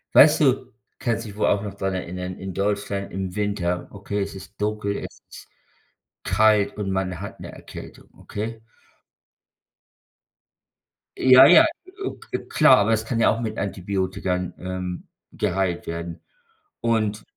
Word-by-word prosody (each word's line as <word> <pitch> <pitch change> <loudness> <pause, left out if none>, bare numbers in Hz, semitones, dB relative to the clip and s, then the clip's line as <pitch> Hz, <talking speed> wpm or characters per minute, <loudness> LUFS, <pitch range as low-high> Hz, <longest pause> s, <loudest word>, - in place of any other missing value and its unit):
Weißt 155 +2 +8
du 130 -3 +2 0.3
kannst 115 -1 -1
du 105 - -7
dich 100 - -11
wohl - - +2
auch 100 0 +2
noch 100 -2 -5
daran 95 -1 -2
erinnern, 90 0 -5
in 95 -1 -6
Deutschland, 100 0 -2
im 95 0 -4
Winter 100 -4 -1
okay, 100 0 -4
es 100 0 -4
ist 95 +2 -12
dunkel, 105 -1 -1
es - - -8
ist - - -12 0.8
kalt 105 -2 +3
und 100 -2 -2
man 95 -2 -2
hat 100 - -8
'ne - - -8
Erkältung, - - -11
okay? 110 +2 -6 2.6
Ja, 130 +1 +8
ja, 320 - +8 0.4
o - - -2
k - - -5
klar, 145 -5 +6
aber 105 +2 +2
es 110 - +1
kann 115 0 -1
ja - - +5
auch 115 - -5
mit 110 -1 -3
Antibiotika, 95 -2 -2
ähm, 90 -1 -5 0.3
geheilt 90 -1 -1
werden. 85 +1 -5 0.6
Und 110 -2 0
100 Hz, 150 wpm, -24 LUFS, 95-110 Hz, 2.6 s, Weißt